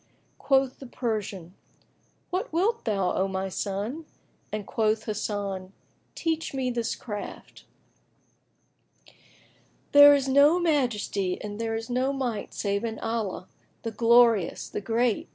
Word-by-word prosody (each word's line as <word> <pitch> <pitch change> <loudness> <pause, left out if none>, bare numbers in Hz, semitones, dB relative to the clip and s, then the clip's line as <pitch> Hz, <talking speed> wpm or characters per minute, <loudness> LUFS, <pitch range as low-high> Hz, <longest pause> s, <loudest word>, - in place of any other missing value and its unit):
Quoth 270 -2 +2
the 270 - -9
Persian, 210 -8 -4 0.8
"What 370 +2 -2
wilt 405 +8 0
thou, 195 -5 0
O 190 - +1
my 190 0 -3
son?"; 210 - -4 0.4
and 210 -1 -4
quoth 220 0 0
Hasan, 200 -3 -3 0.4
"Teach 325 -3 -2
me 255 -2 -1
this 235 -2 -2
craft." 210 -3 -8 2.3
"There 285 0 +9
is 275 -1 -1
no 285 +6 +5
Majesty 240 - 0
and 210 +1 -5
there 225 -1 -1
is 225 0 -4
no 255 +2 +1
Might 245 -7 -3
save 200 +1 -1
in 225 -1 -3
Allah, 225 -5 -3 0.4
the 230 - -3
Glorious, 230 -4 +3
the - - -4
Great!" 230 +2 0
225 Hz, 125 wpm, -27 LUFS, 205-265 Hz, 2.3 s, There